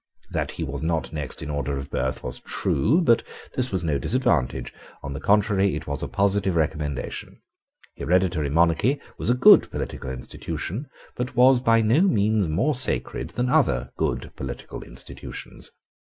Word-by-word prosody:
That - - -2
he - - -4
was - - -4
not 80 -1 -1
next 75 -1 -5
in 75 - -4
order 70 -1 -2
of 70 +1 -7
birth 65 +1 -2
was 65 0 -3
true: 130 - +1
but 120 -8 +4 0.3
this 130 0 0
was 95 -3 -1
no 75 -4 0
disadvantage: 115 - 0 0.3
on 70 - -5
the 70 - -5
contrary, 100 -3 +2
it 80 +1 -5
was 70 -1 -3
a - - -2
positive 100 -2 +1
recommendation. 75 -3 -2 0.6
Hereditary 90 -4 +1
monarchy 85 - +2 0.2
was - - -1
a 120 - +4
good 125 - +7
political - - -5
institution, 85 - -5 0.3
but 125 0 -4
was 125 +1 +6
by 115 -2 +4
no 115 +9 +4
means 110 - +2
more 110 - +1
sacred 130 0 0
than 125 +1 +1
other 60 - +2
good - - -2
political - - -7
institutions. - - -6
95 Hz, 160 wpm, -24 LUFS, 75-120 Hz, 0.6 s, good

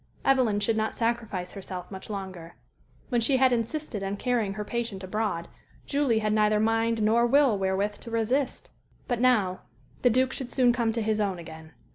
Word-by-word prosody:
Evelyn 250 -6 +3
should 220 +2 +1
not 220 0 -1
sacrifice 225 -6 -2
herself 185 -2 -7
much 190 +1 -8
longer. 185 -5 -6 0.6
When 240 -3 +1
she 260 +4 +3
had 260 -1 +4
insisted 235 0 -2
on 195 +1 -3
carrying 225 -4 0
her 210 -1 -4
patient 230 -4 -3
abroad, 185 -3 -2 0.4
Julie 280 -5 +1
had 215 -1 +1
neither 215 0 +3
mind 225 0 +1
nor 230 +3 +4
will 275 -2 +4
wherewith 195 +2 -1
to - - -10
resist. 240 +4 -1 0.4
But 245 -2 -1
now 210 -8 +3 0.4
the 245 - +5
Duke 255 +2 +2
should 260 -3 -4
soon 250 -2 +4
come 235 -2 +1
to 230 -1 -1
his 215 0 0
own 195 -3 0
again. 160 -1 -11
220 Hz, 180 wpm, -27 LUFS, 195-240 Hz, 0.6 s, the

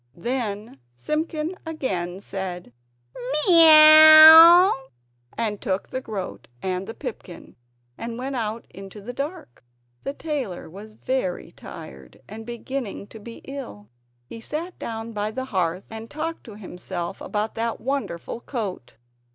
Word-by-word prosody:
Then 215 - -4 0.2
Simpkin 310 - -3
again 195 - -4
said 180 -8 -7 0.7
"Miaw!" 320 +2 +9 0.7
and 215 -3 -3
took 190 0 -3
the 260 - -4
groat 205 -7 -7
and 185 +3 -4
the 225 - -8
pipkin, 220 - -9 0.4
and 230 0 -6
went 265 +2 -5
out 225 -1 -4
into 195 +3 -11
the 230 +5 -8
dark. 280 - -7 0.4
The 275 - -5
tailor 275 - -5
was 215 +4 -12
very 255 -10 -3
tired 65 -2 -12
and 220 +2 -10
beginning 240 -3 -6
to 220 - -12
be 230 +2 -11
ill. 250 - -9 0.4
He 225 - -11
sat 330 +9 -6
down 225 0 -6
by 210 0 -2
the 260 +4 -5
hearth 185 -5 -2
and 225 +1 -9
talked 325 +2 -6
to 215 -4 -11
himself 180 -2 -7
about 210 +1 -3
that 230 0 -3
wonderful 250 -8 -4
coat. 205 - -6
225 Hz, 130 wpm, -23 LUFS, 190-280 Hz, 0.7 s, Miaw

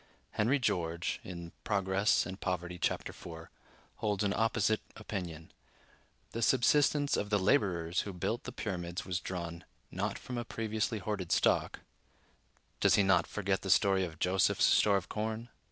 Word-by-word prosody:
Henry 115 +6 +2
George 85 -9 -1 0.4
("Progress 100 0 +2
and 95 +1 -7
Poverty," 90 -1 -3
chap. - - 0
iv) 80 -1 -9 0.5
holds 105 -1 0
an 100 -1 +1
opposite 110 -1 +2
opinion: 90 -7 -6 0.8
"The 115 - -4
subsistence 145 +3 +3
of 105 - -2
the 105 - +3
laborers 95 -6 +2
who 100 - -5
built 95 +6 -3
the 125 - -5
Pyramids 90 -6 -4
was 90 -2 -1
drawn, 85 -2 -5 0.3
not - - -2
from 125 -1 -5
a - - -2
previously 110 0 -2
hoarded 100 -4 -3
stock" - - +2 1.0
(does - - +5
he 100 - +4
not 95 -3 +3
forget 100 -2 -1
the 95 - -5
story 95 +2 +4
of 80 -3 -5
Joseph's 90 +3 +3
store 100 -2 +5
of 95 - -4
corn?) 110 +2 -3
100 Hz, 150 wpm, -32 LUFS, 90-110 Hz, 1.0 s, does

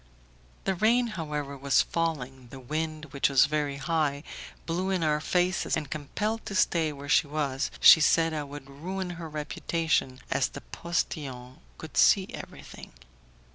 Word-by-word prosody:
The 190 - +1
rain, 230 +6 +2
however, 150 -4 -4
was 140 0 +3
falling, 135 -6 -3
the 135 +3 -10
wind, 155 +2 -4
which 140 - +2
was 135 -1 +6
very 145 -1 -1
high, 145 -1 -1 0.4
blew 180 +3 -1
in 185 -3 0
our 150 -1 +2
faces, 180 +3 +1
and, 150 -2 -5
compelled 210 +9 -3
to 200 - -4
stay 165 -4 +2
where 145 0 -9
she 150 - +4
was, 140 -2 -1
she 160 - +9
said 165 +1 +3
I 155 - -2
would 145 -1 -9
ruin 180 +7 -5
her 165 -2 -7
reputation, 150 -2 -1
as - - +2
the - - -9
postillion 130 - -4 0.2
could - - -9
see - - +6
everything. - - -10
155 Hz, 155 wpm, -28 LUFS, 140-170 Hz, 0.4 s, she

